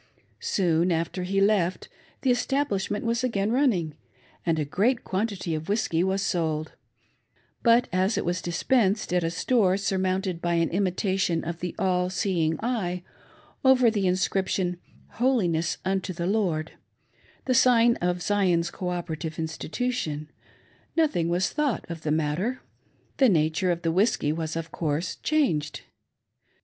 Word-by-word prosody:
Soon 175 -2 +1
after 165 +2 -1
he 195 +2 0
left, 195 -3 +2 0.4
the 260 - +4
establishment 245 -5 -1
was 235 +1 0
again 215 -4 0
running, 225 - +1 0.5
and 165 -2 +1
a 150 - 0
great 225 - +1
quantity 190 -3 -2
of 155 +2 -4
whiskey 190 -5 +1
was 190 +1 0
sold; 160 -3 -1 0.9
but 235 +1 +4
as 185 +4 +1
it - - -1
was 175 +1 -1
dispensed 195 +2 +1
at 180 -1 +2
a 165 - 0
store 185 +2 +2
surmounted 190 -2 -1
by 170 0 0
an 165 -1 +1
imitation 185 -2 0
of 170 +1 -5
the 180 0 -4
All 180 -1 +1
seeing 175 -5 0
Eye, 185 -8 -2 0.6
over 255 -3 +5
the 200 -3 0
inscription, 185 0 0 0.2
" - - -27
Holiness 180 -11 +1
unto 190 0 -1
the 170 0 -3
Lord 180 -6 0 0.3
" - - -42
— - - -31
the 255 - +2
sign 235 -1 +5
of 175 0 -1
Zion's 180 -4 +1
Cooperative 170 -3 -4
Institution 160 -1 -3 0.3
— - - -34
no 325 - +6
thing 175 - -1
was 175 +2 +1
thought 290 -6 -1
of 165 -2 -6
the 160 - -3
matter. 160 - -1 0.5
The 265 -3 +5
nature 160 0 +2
of 170 0 -1
the 165 - +1
whiskey 185 -4 +2
was, 160 -1 -3
of 165 0 -4
course, 160 +2 -2
changed. 210 - 0
185 Hz, 150 wpm, -26 LUFS, 165-215 Hz, 0.9 s, no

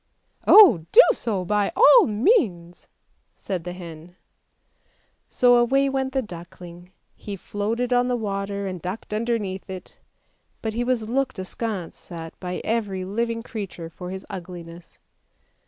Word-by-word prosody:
" - - -45
Oh, 265 - +8
do - - +10
so 205 - -3
by 205 +2 +1
all 480 +1 +7
means," 210 - 0 0.5
said 185 -4 -5
the 180 - -4
hen. 175 -1 -10 1.1
So 245 -1 +4
away 270 +3 +3
went 265 -1 -2
the 265 -1 0
duckling, 175 -1 -11 0.2
he 205 - -7
floated 225 +6 -2
on 245 0 +3
the 250 - 0
water 200 -2 -3
and 185 -3 -5
ducked 185 +5 -6
underneath 215 -4 -2
it, 185 -1 -9 0.6
but 220 -1 -2
he 235 +2 -1
was 240 -3 -1
looked 260 +1 -1
askance 190 -2 -5
at 165 -1 -7
by 180 -1 -5
every 205 -5 -2
living 230 +3 -2
creature 190 -8 -7
for 180 +2 -8
his 190 +1 -7
ugliness. 170 -2 -10
200 Hz, 140 wpm, -23 LUFS, 180-235 Hz, 1.1 s, do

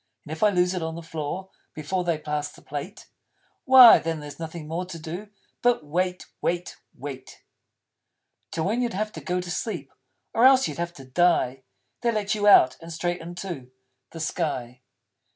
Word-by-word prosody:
And 150 - -9
if 160 - -6
I 215 - +6
lose 180 -2 +2
it 180 - -2
on 160 0 -3
the 170 - -7
floor 165 +4 -5 0.2
Before 170 +4 -2
they 170 -2 0
pass 150 -1 -3
the - - -17
Plate, 150 +8 -7 0.6
Why 260 -3 +10
then 165 -1 -3
there's 145 0 -9
nothing 160 -1 -6
more 165 +3 -2
to 180 -2 -8
do 170 +6 -7 0.3
But 240 -10 +2
wait 180 +4 -1 0.2
wait 175 +1 -2 0.2
wait. 135 -1 -9 1.1
Till, 160 - -2
when 225 +6 0
you'd 235 -5 -1
have 215 +2 -2
to - - -9
go 180 0 -1
to 180 0 -5
sleep 220 +5 -4 0.4
Or 230 - +2
else 265 0 +7
you'd - - -6
have 170 0 -3
to 135 - -11
die, 135 -3 +2 0.4
They 240 -1 +2
let 210 -2 -1
you 210 -1 0
Out, 130 -10 +7
and 165 0 -9
straight 175 +2 -2
into 170 -6 -7 0.4
The 165 - -9
Sky! 135 -7 -3
170 Hz, 185 wpm, -25 LUFS, 155-190 Hz, 1.1 s, Why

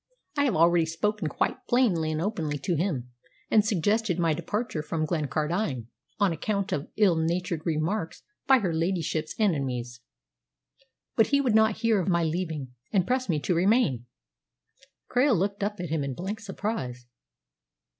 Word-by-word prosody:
I 285 -1 +2
have 250 - +1
already 165 0 +4
spoken 170 +3 -1
quite 150 - -2
plainly 190 -11 +2
and 155 - -2
openly 165 -6 -2
to 160 +6 -2
him, 150 -8 -1 0.4
and 215 - +6
suggested 205 -1 +1
my 165 -3 +2
departure 175 +2 -2
from 155 +1 -2
Glencardine 150 - -1 0.3
on 200 -4 +3
account 200 +4 -2
of 150 -5 -2
ill 200 -5 +5
natured 170 0 -1
remarks 165 +3 -1 0.2
by 265 - +7
her 190 -8 -1
ladyship's 165 -2 -1
enemies. 130 - -1 1.1
But 225 - +4
he 280 - +3
would 255 -5 +1
not 220 -1 +4
hear 225 -4 +2
of - - -4
my 170 -2 +2
leaving, 160 -4 -2 0.2
and 190 -4 +2
pressed 255 0 0
me 155 -3 +2
to 180 - 0
remain." 170 - +2 1.0
Krail 250 -2 +3
looked 200 +3 -1
at 205 +1 -1
him 160 -4 -2
in 135 -2 -3
blank 195 - -4
surprise. 195 - -4
175 Hz, 155 wpm, -27 LUFS, 155-210 Hz, 1.1 s, by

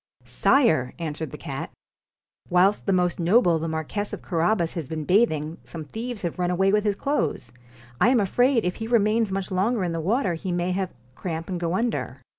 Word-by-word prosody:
'Sire!' 160 - +2
answered 160 -1 -4
the 150 - -8
cat, 140 -4 -5 0.4
* - - -38
whilst 190 +4 +3
the - - +3
most 180 -1 +1
noble 175 -1 +4
the 165 - -3
Marquess 160 +6 -3
of - - -6
Carabas 170 0 +1
has 160 -6 -5
been 155 -1 -3
bathing 165 -5 +2
some 160 -2 -8
thieves 230 +4 -6
have 170 0 -3
run 175 0 +1
away 190 +2 +2
with 210 0 +2
his 205 -1 +1
clothes. 165 - -1 0.5
I - - +5
am 250 -2 +4
afraid 245 +4 +2
if 180 - -1
he 225 - -4
remains 225 -2 +2
much 195 0 -3
longer 200 +4 +1
in 175 - -1
the 165 - -2
water 200 - +1
he 180 +3 -4
may 175 +1 0
have 185 0 -2 0.2
cramp 165 +3 -5
and 180 -2 -2
go 170 +1 -1
under.' 225 - -1
180 Hz, 205 wpm, -25 LUFS, 165-210 Hz, 0.5 s, I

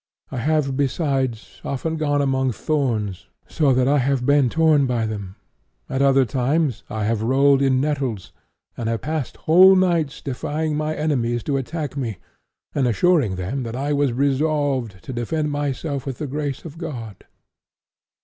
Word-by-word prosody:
I 135 - -4
have 140 +1 +1
besides 135 -4 -1
often 160 +4 -2
gone 145 -2 +1
among 130 -2 +1
thorns 115 - -2 0.2
so 150 -4 +2
that 125 0 +3
I 145 +1 +3
have 135 -1 0
been 140 -2 +4
torn 155 -2 +3
by 120 -3 0
them; 100 -3 -5 0.5
at 135 +1 -2
other 135 -1 +4
times 130 +3 0
I 110 -1 -3
have 110 0 0
rolled 135 +4 +4
in 135 -1 +3
nettles, 135 -9 -2 0.4
and 115 -1 -3
I - - +1
have 115 - -3
passed 155 -4 -3
whole 185 +4 +8
nights 170 -6 +1
defying 150 +3 -3
my 155 +1 -1
enemies 120 -6 0
to 140 -2 0
attack 145 +1 -4
me, 120 -8 -3 0.6
and 135 -4 +1
assuring 135 - +2
them 95 +10 -3
that 115 -1 -5
I 140 +3 -1
was 145 -2 +2
resolved 135 -5 0
to 130 - -6
defend 150 +6 -2
myself 145 -1 -3
with 130 -3 -4
the 150 - -4
grace 145 0 -4
of 165 0 -9
God." 120 - -7
135 Hz, 165 wpm, -22 LUFS, 125-150 Hz, 0.6 s, whole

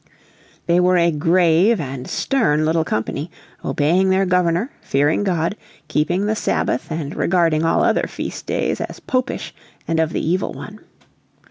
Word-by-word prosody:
They 170 +1 +3
were 180 0 +4
a 170 0 +3
grave 170 +6 +3
and 135 -3 -5
stern 185 - +1
little 160 +1 +2
company, 145 +5 -3 0.3
obeying 175 +6 +2
their 190 +1 +3
Governor, 180 +6 +1
fearing 145 +7 +1
God, 175 0 0 0.3
keeping 175 +6 0
the 215 +1 0
Sabbath 130 - -1
and 155 -2 -4
regarding 165 -3 +2
all 165 - +2
other - - +2
feast - - -6
days - - -1
as - - -6
Popish 255 0 -2 0.3
and 165 -1 0
of 160 0 +1
the - - -2
evil 180 +3 0
one. 210 +1 -9
170 Hz, 150 wpm, -20 LUFS, 155-185 Hz, 0.3 s, were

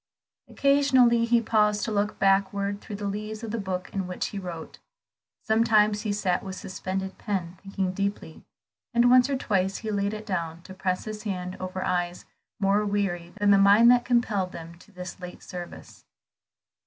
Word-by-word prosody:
Occasionally, 260 -4 +4
he 235 0 +3
paused 210 -2 +2
to 225 - -3
look 210 0 -1
backward 200 +1 +1
through 205 - -7
the 205 0 -5
leaves 215 +2 -4
of 225 - -4
the 230 - -2
book 185 -2 -4
in 195 -3 -2
which 180 - -3
he 205 - -5
wrote; 175 -4 -8 0.6
sometimes 215 -2 +3
he 215 -2 -2
sat 195 -3 0
with 190 -1 -7
suspended 190 -1 -5
pen, 185 -4 -3
thinking 195 -2 -3
deeply; 200 -4 -4 0.5
and 240 +1 +5
once 255 +1 +6
or 275 - +1
twice 195 -5 0
he 220 -1 -4
laid 200 +1 -1
it 215 0 -8
down, 170 -4 -3
to 190 - -11
press 185 -1 -2
his 215 -1 -6
hand 185 -3 -4
over 185 0 -4
eyes 175 -1 -2 0.3
more 200 +1 +2
weary 195 -4 -2
than 205 0 +3
the 200 - +6
mind 205 +4 +7
that 245 -1 +4
compelled 220 -7 0
them 165 0 -9
to 210 - -19
this 180 -1 -8
late 180 -1 -9
service. 175 -1 -9
200 Hz, 180 wpm, -26 LUFS, 185-215 Hz, 0.6 s, mind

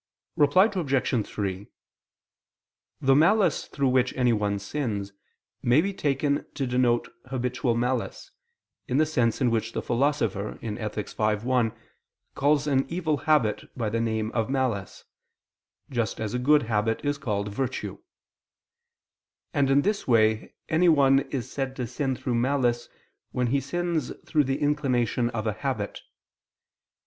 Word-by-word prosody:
Reply 150 +7 +5
Obj. 135 - 0
3: 100 -1 -4 1.3
The 135 0 +4
malice 175 +2 +3
through 135 -1 0
which 125 0 +2
anyone 105 -5 +2
sins, 100 -2 -3 0.5
may 120 +4 +4
be 195 +4 0
taken 145 -4 0
to 135 - -1
denote 125 -1 +1 0.2
habitual 125 -1 -1
malice, 125 +1 -2 0.6
in 130 - 0
the 155 - +4
sense 125 -6 0
in 125 -3 +3
which 115 0 -1
the - - -2
Philosopher 115 -6 0
(Ethic. 105 -2 -4
v, 105 0 -1
1) 125 -3 +2 0.6
calls 145 +1 +2
an 135 -2 +1
evil 165 -3 0
habit 130 -9 +2
by 110 -4 -1
the 115 +1 0
name 110 -1 -1
of 115 -1 -1
malice, 130 -8 -2 0.9
just 115 -4 -1
as 110 -2 -3
a 125 - 0
good 145 +3 +4
habit 110 +2 -1
is 145 0 0
called 105 -6 -2
virtue: 130 +5 -3 1.5
and 140 -4 +2
in 140 +1 +4
this 205 0 -1
way 110 -2 +2
anyone 155 -5 +4
is 130 -5 -4
said 135 -1 -3
to 125 - -3
sin 130 +3 -2
through 125 - -3
malice 120 -1 +1 0.4
when 125 - 0
he 140 - +3
sins 170 -5 -2
through 150 -3 +2
the 135 +1 0
inclination 125 -5 +1
of 115 -3 -4
a 110 - 0
habit. 110 -3 -3
125 Hz, 140 wpm, -26 LUFS, 115-145 Hz, 1.5 s, Reply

